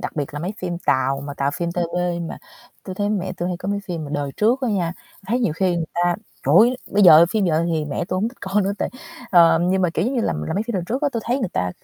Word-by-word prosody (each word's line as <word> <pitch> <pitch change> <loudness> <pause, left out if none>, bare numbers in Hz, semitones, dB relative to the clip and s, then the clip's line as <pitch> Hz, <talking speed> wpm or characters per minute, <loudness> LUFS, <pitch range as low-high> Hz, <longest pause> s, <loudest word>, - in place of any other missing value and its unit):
đặc - - -6
biệt 145 -1 -3
là 145 - -4
mấy 185 +5 -3
phim 175 -2 -4
Tàu 135 -2 +1
mà 145 - -6
Tàu 140 0 0
phim 170 -1 -2
TVB 175 0 -1
mà - - -7 0.5
tui 185 - -6
thấy 205 +2 -1
mẹ 190 -3 -2
tui 180 -1 -3
hay 180 - -2
có 185 +2 -6
mấy 200 0 -1
phim 170 -4 -4
mà 145 - -8
đời 145 -1 -2
trước 235 +5 +2
á 255 - -1
nha, 180 -5 0 0.3
thấy 235 +5 +1
nhiều 230 -11 +1
khi 180 +1 0
người 165 - -1
ta 175 0 +1 0.3
trời 145 - +3
ơi, 245 +3 +4 0.2
bây 205 0 +3
giờ 170 -2 +9
phim 215 -1 +1
giờ 165 -1 +1
thì 155 -2 0
mẹ 150 +4 -3
tui 185 +1 -3
hổng 210 +4 0
thích 245 - -16
coi 200 +2 0
nữa 195 +1 0
tại - - -2 0.4
ờm. 170 -1 +5
Nhưng 190 0 +1
mà, 180 - +2
kiểu, 165 - +1
giống 255 +4 -1
như 245 - +1
là - - 0
là - - -3
mấy 205 - 0
phim 235 - -3
đằng 180 -3 -1
trước 255 +10 -3
á 290 - +3
tui 230 - -2
thấy 245 +3 0
người 235 -9 -2
ta 90 0 -1
180 Hz, 305 wpm, -21 LUFS, 165-205 Hz, 0.5 s, giờ